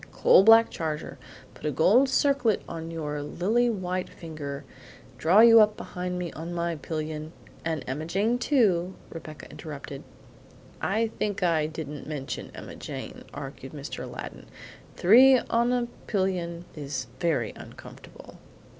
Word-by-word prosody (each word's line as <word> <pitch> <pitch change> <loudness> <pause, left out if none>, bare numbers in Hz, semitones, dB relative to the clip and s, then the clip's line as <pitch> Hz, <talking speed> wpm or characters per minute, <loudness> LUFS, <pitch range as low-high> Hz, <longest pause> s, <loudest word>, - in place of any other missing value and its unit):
"Coal 190 - +6
black 225 +2 +7
charger; 155 -2 -4 0.3
put - - -17
a - - +2
golden 205 - +4
circlet 265 -4 +2
on 165 0 -6
your 150 -3 -4
lily 210 +11 +1
white 185 -4 -2
finger, 150 -4 -7 0.6
draw 180 +7 +6
you 230 -1 +9
up 210 0 +3
behind 180 0 -5
me 180 -2 -4
on 170 +2 -6
my 170 0 -1
pillion" 155 +1 -5 0.3
"And 160 -2 -2
Emma 145 +5 -4
Jane, 210 +8 +1
too," 195 -10 +2 0.2
Rebecca 155 -2 -9
interrupted. 140 -2 -8 0.8
"I 220 +2 0
think 205 -2 -1
I 160 -3 +2
didn't 150 -3 -7
mention 145 -3 -5
Emma - - -9
Jane," - - -7
argued - - -8
Mr. - - -6
Aladdin. - - -8 0.5
"Three 255 +8 +7
on 235 0 +1
a 245 -1 +1 0.2
pillion 180 -4 -1
is 140 -3 -4
very 155 -10 0
uncomfortable. - - -13
175 Hz, 135 wpm, -27 LUFS, 155-215 Hz, 0.8 s, you